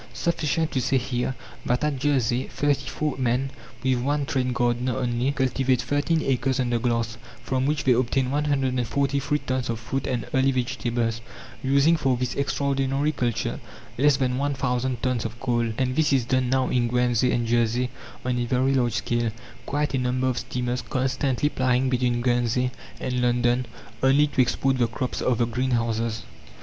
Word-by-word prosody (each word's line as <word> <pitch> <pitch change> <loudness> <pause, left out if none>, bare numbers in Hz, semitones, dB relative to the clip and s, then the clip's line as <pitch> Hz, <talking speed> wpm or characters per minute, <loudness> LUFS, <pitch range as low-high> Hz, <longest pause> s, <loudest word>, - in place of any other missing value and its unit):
Sufficient 160 -1 0
to 130 - 0
say 135 +2 +2
here, 125 0 -2 0.3
that 125 +4 0
at 150 -3 0
Jersey, 130 -3 +1
thirty 140 -2 0
four 150 -3 -2
men, 130 +2 0 0.3
with 130 -1 +2
one 145 +2 0
trained 125 -2 -1
gardener 120 +1 0
only, 125 +1 0
cultivate 130 -2 +1
thirteen 145 +4 +1
acres 135 0 0
under 120 -2 +1
glass, 115 -1 -1 0.2
from 130 0 0
which 150 0 0
they 130 - +3
obtain 125 +1 +1
143 140 0 0
tons 130 -1 -1
of 115 -1 -2
fruit 125 +4 -3
and 125 -5 -1
early 130 +1 +3
vegetables, 120 -2 -1 0.4
using 140 +5 +4
for 135 -5 +1
this 125 0 -2
extraordinary 140 +1 0
culture 120 -6 -2 0.4
less 145 0 +5
than 130 -1 0
1,000 130 -3 -1
tons 125 -3 0
of 115 +1 -6
coal. 120 -3 0
And 130 -1 0
this 155 -1 +2
is 130 -4 +2
done 130 0 +1
now 130 0 +2
in 120 -1 +2
Guernsey 125 0 +2
and 120 - 0
Jersey 120 +1 +1 0.3
on 125 -1 0
a 120 - 0
very 130 +2 +1
large 120 -4 +1
scale, 120 0 0 0.4
quite 145 0 -1
a 135 - +1
number 125 +1 0
of 130 -2 0
steamers 125 0 -2
constantly 130 +2 0
plying 130 -1 +1
between 125 -1 +1
Guernsey 120 0 +1 0.3
and 125 -1 -1
London, 120 0 +2 0.3
only 135 +3 +5
to 145 -3 +1
export 130 +1 +1
the 120 - +3
crops 125 +2 -3
of 125 - +1
the 120 - +2
greenhouses. 115 -2 -1
130 Hz, 170 wpm, -25 LUFS, 120-135 Hz, 0.4 s, less